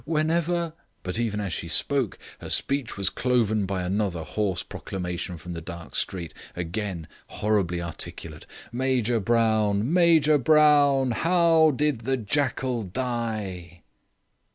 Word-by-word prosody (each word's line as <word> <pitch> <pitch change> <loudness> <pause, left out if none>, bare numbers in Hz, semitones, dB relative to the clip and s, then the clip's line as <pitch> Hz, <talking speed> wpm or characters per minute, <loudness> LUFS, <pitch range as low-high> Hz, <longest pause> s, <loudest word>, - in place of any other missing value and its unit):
Whenever 165 +2 0
" - - -44
But 90 +5 -3
even 110 -3 -1
as 100 -4 -3
she - - -4
spoke 130 - 0 0.2
her - - -8
speech 135 -7 +2
was 100 -1 +1
cloven 110 -5 +1
by 95 -1 -2
another 95 -3 -1
hoarse 95 -1 -2
proclamation 90 -1 -5
from 90 +2 -8
the 85 - -6
dark 85 0 -9
street, 85 -4 -3 0.2
again 90 -1 -4 0.2
horribly 100 -5 -1
articulate. 85 -1 -6 0.2
"Major 120 -2 +1
Brown, 110 - +1
Major 160 -4 +5
Brown, 145 -2 +4
how 165 +3 +4
did 150 -2 0
the 130 +3 0
jackal 130 0 -1
die?" 105 - -4
110 Hz, 130 wpm, -25 LUFS, 95-140 Hz, 0.2 s, Major